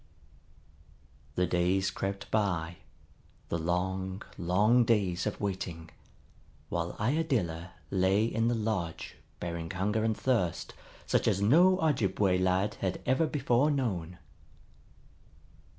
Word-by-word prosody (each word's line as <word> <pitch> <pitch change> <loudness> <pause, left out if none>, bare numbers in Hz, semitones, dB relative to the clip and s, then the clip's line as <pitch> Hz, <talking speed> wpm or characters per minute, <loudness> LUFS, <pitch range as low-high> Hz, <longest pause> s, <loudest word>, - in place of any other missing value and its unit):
The 90 - +2
days 90 +2 +1
crept 100 0 -4
by, 90 -6 0 0.7
the 85 - -1
long, 95 +3 -2
long 105 +8 +3
days 100 -5 +1
of 105 - -3
waiting, 90 -5 -4 0.8
while 85 0 -2
Iadilla 105 - -1 0.2
lay 95 +3 +3
in 115 0 0
the 120 - +1
lodge 105 -7 -3 0.2
bearing 85 -1 -4
hunger 105 +5 -1
and 110 -1 0
thirst 110 -11 0 0.3
such - - +1
as 95 - +2
no 170 - +5
Ojibway 100 - +2
lad 95 +2 +1
had 95 -2 -1
ever 130 +6 +2
before 135 -1 +2
known. 95 - -2
95 Hz, 110 wpm, -30 LUFS, 90-115 Hz, 0.8 s, no